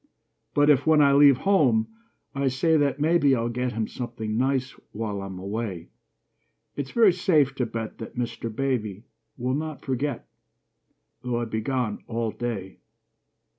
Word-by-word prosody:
But 145 +1 +5
if, 140 - +2
when 160 -1 +5
I 140 -1 +5
leave 140 -2 +7
home, 135 - +3 0.5
I 140 0 0
say 135 +6 +2
that 145 -2 +1
maybe 150 -3 +3
I'll 115 -1 -1
get 125 +1 -2
him 110 -1 -2
something 115 -3 -5
nice 130 +2 0 0.2
while 105 -2 -3
I'm 95 -1 -7
away, 95 -3 -5 0.8
It's 140 -2 -4
very 220 -2 +5
safe 155 -7 +2
to 125 - 0
bet 115 -1 -6
that 110 - -8
Mr. 115 -1 -3
Baby 110 -5 -2 0.3
Will 125 +1 -1
not 155 -1 -4
forget, 135 0 -2 0.9
though 125 -1 -2
I 120 - -2
be 110 -1 -3
gone 125 -3 -2
all 115 -1 -2
day. 110 -4 -5
125 Hz, 155 wpm, -25 LUFS, 110-140 Hz, 0.9 s, leave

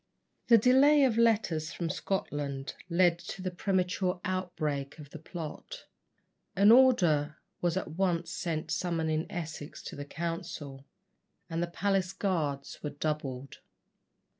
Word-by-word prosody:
The 230 - +8
delay 270 +6 +6
of 250 -4 +3
letters 190 -9 +2
from 170 -3 -3
Scotland 145 -5 -3 0.2
led 170 0 +3
to 185 - -7
the 185 - -2
premature 180 0 0
outbreak 155 -7 -2
of 145 -3 -12
the 160 - -8
plot. 170 - -8 0.7
An 200 +2 +6
order 175 - +5 0.2
was 175 0 +1
at 190 - -3
once 175 0 0
sent 165 -2 -3
summoning 165 -2 -1
Essex 160 -3 -6
to - - -7
the 145 - -5
council, 145 -4 -5 0.6
and 165 +1 -1
the 175 - 0
palace 190 +1 0
guards 155 -8 -2
were 150 - -3
doubled. 140 -3 -4
170 Hz, 130 wpm, -30 LUFS, 150-190 Hz, 0.7 s, The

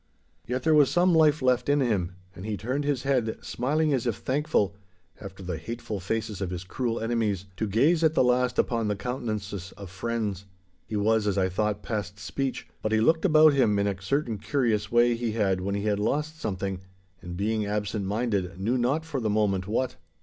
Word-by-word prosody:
Yet 125 +2 -2
there 160 - +4
was 150 -3 +6
some 175 +1 +3
life 155 -3 +4
left 125 0 +2
in 145 0 +4
him, 100 -9 0 0.2
and 90 - -9
he 105 -1 -3
turned 130 +9 -2
his 145 -3 0
head, 125 -5 0
smiling 150 +5 0
as 125 -2 0
if 115 - 0
thankful 130 -8 0 0.5
(after 95 -1 -9
the 90 -3 -4
hateful 110 +2 -5
faces 105 +1 -3
of 95 - -1
his 90 -1 -5
cruel 115 +4 -2
enemies) 110 -4 -1
to 110 - -1
gaze 145 - +3
at 160 0 +3
the - - +5
last 125 0 +2
upon 115 -2 +1
the 105 - 0
countenances 105 -5 -4
of 100 -3 -9
friends. 105 -1 -3 0.4
He 110 - -4
was, 105 +1 +2
as 100 -1 0
I 95 -1 +2
thought, 105 +2 -1
past 105 -2 -4
speech; 135 +5 -3
but 110 - -1
he 110 - +3
looked 160 - +3
about 155 -3 +6
him 115 -7 +3
in 100 - +1
a 100 -2 -2
certain 115 +1 -1
curious 115 -7 0
way 120 0 +5
he 115 -1 -2
had 95 -4 +1
when 100 +2 -2
he 100 - -2
had 105 -1 +1
lost 150 +8 -1
something, 95 -3 -3 0.4
and, 90 0 -7
being 105 +1 0
absent 105 0 -2
minded, 100 -4 -1
knew 115 +6 0
not 140 +7 +1
for 150 -4 -3
the 110 -3 -1
moment 100 -3 +1
what. 125 +4 -1
110 Hz, 205 wpm, -27 LUFS, 100-130 Hz, 0.5 s, was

